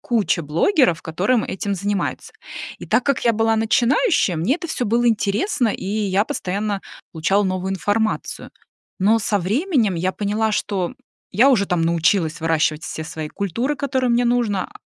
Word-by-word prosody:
куча 210 -7 0
блогеров, 170 - +2
которые 195 +9 0
этим 200 +1 -3
занимаются. 200 +1 -3 0.5
И - - -9
так 250 - +2
как 280 -4 0
я 235 - +4
была 225 0 +2
начинающим, 235 - +2
мне 220 +11 +2
это 345 +1 -5
всё 285 -6 -2
было 235 +3 +2
интересно, 225 - +1
и 200 - -4
я 200 0 0
постоянно 200 +1 -3 0.3
получала 185 +5 +1
новую 185 0 -2
информацию. 205 +3 -2 0.5
Но 215 +4 +3
со 205 -1 0
временем 225 - +1
я 180 +2 0
поняла, 215 +1 -1
что 200 0 -2 0.4
я 245 +8 +5
уже 205 -7 +3
там 180 -3 0
научилась 165 0 +1
выращивать 160 -1 +1
все 160 - -5
свои 155 -1 -6
культуры, 230 - -2
которые 260 -3 -1
мне 240 +1 +2
нужно, 235 -5 0
205 Hz, 160 wpm, -21 LUFS, 185-240 Hz, 0.5 s, я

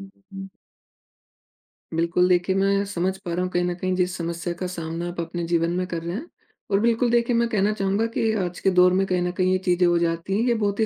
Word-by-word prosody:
हुँ, 195 - -10 0.2
हुँ। 195 0 -7 1.5
बिल्कुल, 170 +2 +2
देखिए 180 +1 +2
मैं 195 +1 +2
समझ 190 -1 -2
पा 175 -3 -6
रहा 180 - -1
हूँ 185 - -2
कहीं 175 0 +1
न 180 - -1
कहीं 185 +1 -2
जिस 180 0 0
समस्या 170 0 -3
का 180 +1 -4
सामना 170 -1 -5
आप 175 - -7
अपने 170 +1 -4
जीवन 170 0 +1
में 185 - -1
कर 170 -2 -4
रहे 170 +2 -4
हैं। 300 +10 -6 0.4
और 195 - +3
बिल्कुल 235 +2 +2
देखिए 235 0 +2
मैं 235 0 +2
कहना 205 -1 +1
चाहूँगा 200 +2 0
कि 225 -1 +1
आज 175 -1 -4
के - - +2
दौर 180 0 +5
में 195 +1 +2
कहीं 180 -1 0
न 180 0 -1
कहीं 185 0 +2
ये 185 - +3
चीज़ें 180 0 +3
हो 175 - +3
जाती 170 +2 -1
हैं - - +1
ये 240 - +3
बहुत 205 -2 -1
ही 220 - +3
185 Hz, 250 wpm, -24 LUFS, 175-195 Hz, 1.5 s, दौर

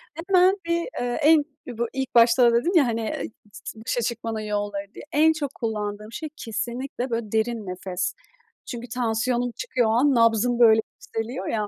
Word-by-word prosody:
Hemen 365 +3 +3
bir, 335 0 +1 0.2
eee, 245 +2 -2
en 310 0 +6 0.2
bu 235 -1 -2
ilk 265 -2 -4
başta 235 +1 +6
da - - +2
dedim 245 +10 +2
ya, 310 -5 +6
hani, 230 -1 -1
eee, 220 - -3 0.2
s 220 - -9
başa 230 +2 -2
çıkmanın 230 -1 -3
yolları 205 -1 -3
diye, - - -10
en 315 +2 +4
çok 290 -3 -4
kullandığım 210 -2 -4
şey 310 +6 -6
kesinlikle 240 +3 -4
böyle 230 -3 -3
derin 220 -1 -1
nefes. 180 0 -3 0.5
Çünkü 240 -1 -6
tansiyonum 240 +1 0
çıkıyor 255 - 0
o - - +2
an, 265 +4 +3
nabzım 230 +1 +3
böyle 220 -2 +6
yükseliyor 225 +4 -5
ya. 210 -2 -1
235 Hz, 175 wpm, -24 LUFS, 220-260 Hz, 0.5 s, en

